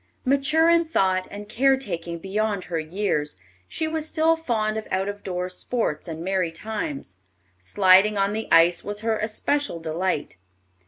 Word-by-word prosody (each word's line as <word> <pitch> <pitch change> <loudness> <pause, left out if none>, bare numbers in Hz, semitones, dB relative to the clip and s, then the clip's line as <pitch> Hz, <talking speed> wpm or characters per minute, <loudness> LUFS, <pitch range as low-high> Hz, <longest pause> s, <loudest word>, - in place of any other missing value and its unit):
Mature 280 +5 +3
in 335 0 +4
thought 190 - +1
and 205 +1 -8
care 265 +5 +3
taking 170 -9 -4
beyond 200 +2 -2
her 165 -1 -3
years, 155 - -2 0.3
she 315 - -2
was 315 -1 -3
still 325 0 +3
fond 220 -9 -1
of 220 - -4
out 200 +2 -2
door 180 -1 -3
sports 185 -3 -2
and 165 0 -6
merry 185 -2 0
times. 220 - -5 0.4
Sliding 190 - +4
on 200 +1 +1
the 220 +1 -3
ice 170 +1 +5
was 205 0 -5
her 220 -1 0
especial 225 0 -1
delight. 160 - -2
205 Hz, 155 wpm, -24 LUFS, 175-250 Hz, 0.4 s, ice